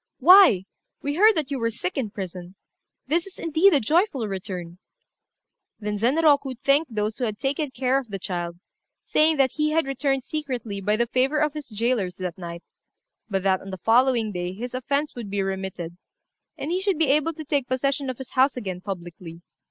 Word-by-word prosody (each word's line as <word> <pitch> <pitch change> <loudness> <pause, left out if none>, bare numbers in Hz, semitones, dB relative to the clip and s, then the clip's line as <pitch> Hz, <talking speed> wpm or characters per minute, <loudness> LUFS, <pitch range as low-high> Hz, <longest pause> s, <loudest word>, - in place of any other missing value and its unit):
"Why, 355 - +7 0.4
we 285 - -1
heard 425 +6 +5
that 295 -3 -1
you 275 - -1
were 230 0 +1
sick 180 -5 -4
in 245 -6 -2
prison. 185 -2 -7 0.5
This 335 +6 0
is, 390 - -14
indeed, 330 +5 +3
a 295 - +4
joyful 285 - +1
return." 185 -3 -6 1.0
Then 210 -1 -3
Zenroku 280 +2 +3
thanked 275 -1 +1
those 215 +2 -1
who - - -2
had 215 -2 -3
taken 280 +5 -1
care 260 +1 +1
of 265 - -9
the 200 - -4
child, 175 -2 -4 0.5
saying 310 0 +3
that 265 -2 +3
he 305 -1 0
had 325 -1 +2
returned 270 0 -1
secretly 250 -10 -4
by 210 +2 +1
the 235 +2 +1
favour 255 +5 +1
of 300 -1 +1
his 300 -4 -7
jailers 215 -4 -1
that 180 -2 -4
night; 170 -1 -7 0.7
but 195 -2 -1
that 190 -1 +2
on 195 - -9
the 190 - -5
following 230 +2 +3
day 180 -1 -4
his 240 +6 -6
offence 280 +4 -1
would 235 -4 -7
be 200 0 -1
remitted, 190 -3 -4 0.6
and 305 - -4
he 365 +2 0
should 385 -3 0
be 315 -3 +2
able 305 +3 +2
to 310 0 -8
take 280 -3 0
possession 275 +1 0
of 255 - -4
his 265 -1 -9
house 260 +1 +3
again 190 -6 -5
publicly. 175 -3 -8
250 Hz, 195 wpm, -24 LUFS, 195-290 Hz, 1.0 s, Why